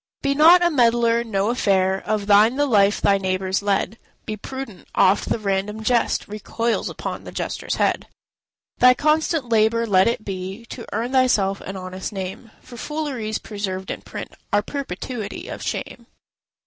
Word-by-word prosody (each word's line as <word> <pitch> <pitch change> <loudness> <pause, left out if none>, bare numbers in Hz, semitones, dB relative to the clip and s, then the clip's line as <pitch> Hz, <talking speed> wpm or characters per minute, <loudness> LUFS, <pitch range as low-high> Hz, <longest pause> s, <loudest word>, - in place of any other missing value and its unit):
Be 280 0 +2
not 335 +5 +7
a 345 - +3
meddler; 235 -3 +3
no 205 -2 -1
affair 190 -5 +1
Of 210 -1 0
thine 210 +4 +5
the 290 +1 +2
life 205 -5 +3
thy 200 0 +3
neighbours 190 0 -1
lead: 200 +2 -1 0.3
Be 215 - -3
prudent; 260 -1 -8
oft 190 +2 +3
the - - +1
random 210 +1 -2
jest 235 +1 +1
Recoils 225 +3 -2
upon - - -6
the - - -9
jester's - - -3
head. - - 0 0.7
Thy 250 0 +7
constant 305 -2 +1
labour 225 +1 +3
let 190 -3 +4
it 230 -2 -1
be 195 +3 -6
To 235 - -8
earn 240 +2 -2
thyself 215 -7 +2
an 195 0 -6
honest 185 0 -6
name, 195 +3 -6
For 240 - -12
fooleries 265 -7 -3
preserved 190 -3 -5
in - - -6
print - - -8 0.2
Are 205 0 +2
perpetuity 240 -4 -5
of - - -7
shame. - - -5
215 Hz, 160 wpm, -22 LUFS, 195-245 Hz, 0.7 s, not